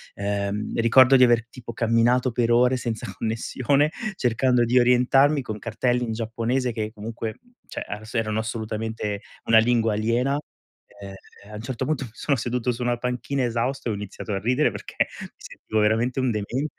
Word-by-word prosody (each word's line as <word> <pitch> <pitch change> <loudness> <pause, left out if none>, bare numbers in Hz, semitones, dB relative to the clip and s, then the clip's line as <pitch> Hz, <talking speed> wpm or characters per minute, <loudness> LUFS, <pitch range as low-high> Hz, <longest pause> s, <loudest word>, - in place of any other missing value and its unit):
ehm, 100 +1 -2
ricordo 130 +3 +6
di 130 - +7
aver 120 -2 +3
tipo 120 -1 -10
camminato 120 +3 +2
per 120 0 0
ore 125 +2 +4
senza 120 -3 -4
connessione 130 +6 0 0.2
cercando 125 -2 +2
di 125 +2 +4
orientarmi 130 +4 +4
con 110 -3 -6
cartelli 120 +3 -1
in 115 - -3
giapponese, 115 +3 -1
che 110 -2 -3
comunque 110 0 -6 0.3
cioè - - -6
a 105 +2 -6
s 110 - -11
erano 110 -1 0
assolutamente 110 -2 -4 0.2
una 115 -1 +6
lingua 115 -1 +2
aliena, 120 +6 +1 0.6
ehm, 100 -1 -8 0.4
a - - -8
un 105 - -6
certo 130 +2 -4
punto 150 -2 -1
mi - - -11
sono 140 +3 0
seduto 125 +1 -1
su 120 - -8
una 120 0 0
panchina 125 +2 -2
esausto, 120 +3 -2
e - - 0
ho - - -3
iniziato 105 +1 -6
a 95 - -1
ridere 125 +8 +2
perché - - -2
mi - - -6
sentivo 110 - -4
veramente 115 +5 +1
un 130 -2 +1
demente 120 +8 -3
115 Hz, 180 wpm, -24 LUFS, 110-125 Hz, 0.6 s, di